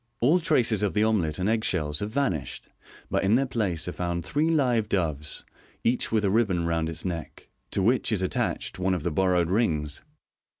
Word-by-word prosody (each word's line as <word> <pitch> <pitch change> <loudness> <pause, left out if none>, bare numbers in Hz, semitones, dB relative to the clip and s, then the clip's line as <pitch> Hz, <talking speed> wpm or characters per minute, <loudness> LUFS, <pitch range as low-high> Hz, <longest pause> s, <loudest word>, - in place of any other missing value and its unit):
All 150 +10 +4
traces 115 - +2
of 100 -5 0
the 105 - +3
omelet 95 -9 +1
and 95 - -1
egg 110 0 +1
shells 75 -7 0
have 105 - -3
vanished, 110 - -2 0.4
but - - +1
in 100 +4 +4
their 135 +2 +2
place 100 -11 -2
are - - -2
found 85 -1 -3
three 150 +10 +1
live 125 -9 +2
doves, 75 -6 -2 0.4
each 120 +2 +1
with 110 -2 +2
a 95 - +2
ribbon 100 -6 +1
round 80 -1 0
its 80 +2 -5
neck, 85 -3 -6 0.2
to 95 - 0
which 120 +3 +2
it 105 - +1
' 95 - 0
ttached - - -2
one 95 0 +1
of 85 - -4
the 85 - -1
borrowed 90 0 +2
rings. 80 -9 0
95 Hz, 205 wpm, -26 LUFS, 85-115 Hz, 0.4 s, All